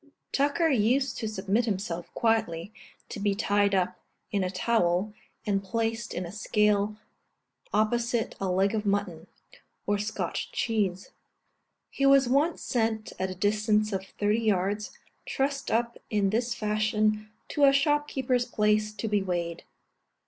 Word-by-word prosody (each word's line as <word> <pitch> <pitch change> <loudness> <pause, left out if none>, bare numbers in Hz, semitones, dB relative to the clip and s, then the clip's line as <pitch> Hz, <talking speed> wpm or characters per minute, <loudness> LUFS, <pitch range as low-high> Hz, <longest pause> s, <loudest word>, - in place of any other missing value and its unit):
(See - - -26
Note 285 - -27
E, - - -49
Addenda.) 280 +1 0
Tucker 330 -2 +3
used 255 +1 +2
to 220 - -2
submit 215 +2 0
himself, 185 -5 -3
quietly, 215 -5 0 0.4
to - - -6
be 200 0 +1
tied 205 -1 +2
up 185 -1 0 0.3
in 200 -2 +1
a 185 - -1
towel, 190 0 +1 0.3
and 200 -1 0
placed 225 +3 -2
in 180 - -2
a 170 - -7
scale 210 0 +1 0.7
opposite 235 +1 +1
a 195 - 0
leg 190 +3 +2
of 215 -1 -1
mutton, 200 -5 -1 0.6
or 205 0 +1
Scotch 220 - -3
cheese. 210 - -1 0.8
He 275 - +1
was 275 -2 +6
once 290 +6 +1
sent 225 -2 -1
a 185 0 -2
distance 210 +2 +1
of 190 -1 -2
thirty 205 +3 0
yards, 205 0 0 0.3
trussed 275 0 -1
up 235 +1 0
in 200 -2 +1
this 235 +2 0
fashion, 215 0 0 0.2
to 290 -2 +3
a 275 - +7
shopkeeper's 275 -3 +1
place, 210 -2 +1
to 225 - -4
be 205 -1 +1
weighed. 175 -3 -3
215 Hz, 150 wpm, -28 LUFS, 195-235 Hz, 0.8 s, a